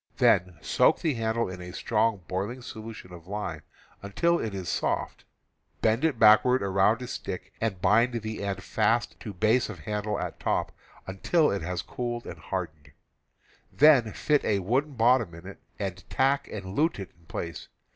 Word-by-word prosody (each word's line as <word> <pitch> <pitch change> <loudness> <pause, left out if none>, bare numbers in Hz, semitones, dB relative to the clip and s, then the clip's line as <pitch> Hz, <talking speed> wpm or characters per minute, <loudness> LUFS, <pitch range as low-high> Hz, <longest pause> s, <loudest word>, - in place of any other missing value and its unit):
Then 90 -1 +3
soak - - +3
the 160 -3 +1
handle 115 0 -1
in 90 -1 -7
a 90 0 -8
strong 110 -3 0
boiling 105 +7 -3
solution 110 -6 -9
of 85 -1 -12
lime 100 -6 -4 0.4
until 170 - +1
it 110 - -3
is 95 -2 -5
soft, - - -2 0.6
bend 110 +4 +2
it 160 -6 +2
backward 110 +3 +6
around 100 +5 +2
a - - -6
stick 95 -4 -6
and 110 -5 -1
bind 115 +6 +3
the 110 -1 -4
end 95 -2 -3
fast 115 +2 0
to 105 - -7
base 110 +7 +2
of 95 -8 -8
handle 105 +3 -2
at - - -5
top, - - -1 0.3
until 150 - +1
it 100 - -2
has 90 +1 -3
cooled 120 -1 -4
and - - -8
hardened; 75 -2 -6 0.8
then 140 -7 +5
fit 150 +6 +1
a 105 - +1
wooden 130 +10 0
bottom 115 -6 +3
in 85 +2 -12
it, 100 - -10 0.2
and 95 -3 -4
tack 135 +1 +1
and 95 -3 -7
lute 160 +3 +2
it 95 -2 -7
in 85 - -25
place. 85 -2 -6
105 Hz, 175 wpm, -27 LUFS, 95-120 Hz, 0.8 s, backward